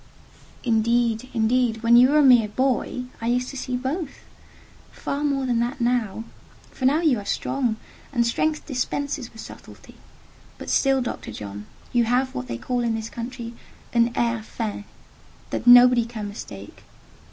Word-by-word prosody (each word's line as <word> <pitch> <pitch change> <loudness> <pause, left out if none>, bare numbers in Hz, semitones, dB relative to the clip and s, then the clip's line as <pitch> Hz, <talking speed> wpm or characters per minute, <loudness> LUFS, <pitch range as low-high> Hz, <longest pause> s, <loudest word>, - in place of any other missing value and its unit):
"Indeed—indeed—when 235 0 +2
you 250 +2 +7
were 300 - +3
a 300 - +6
mere 245 -5 +6
boy 255 +2 -1 0.2
I 230 - -3
used 250 +1 0
to - - -9
see 250 -1 -3
both: 275 +4 -4 0.7
far 280 +1 -4
more 275 -2 0
then 240 -2 +1
than 240 +3 -1
now—for 235 +1 -4
now 290 +5 +3
you 290 -9 +2
are - - -7
strong, 245 -1 -1 0.4
and 240 -4 +1
strength 305 +6 0
dispenses 280 -1 -3
with 225 - -10
subtlety. - - -13 0.6
But - - -6
still,—Dr. 270 -3 0
John, 105 0 -8 0.3
you 240 -1 +3
have 250 +3 +1
what 125 0 -5
they 115 - -4
call 245 - -2
in 235 -2 0
this 220 0 -5
country 235 0 -6 0.4
'un 235 0 +3
air 235 -1 0
fin,' 215 -2 -5 0.7
that - - -3
nobody 245 -1 +8
can, 220 -3 -6
mistake. 100 - -10
240 Hz, 150 wpm, -24 LUFS, 225-260 Hz, 0.7 s, nobody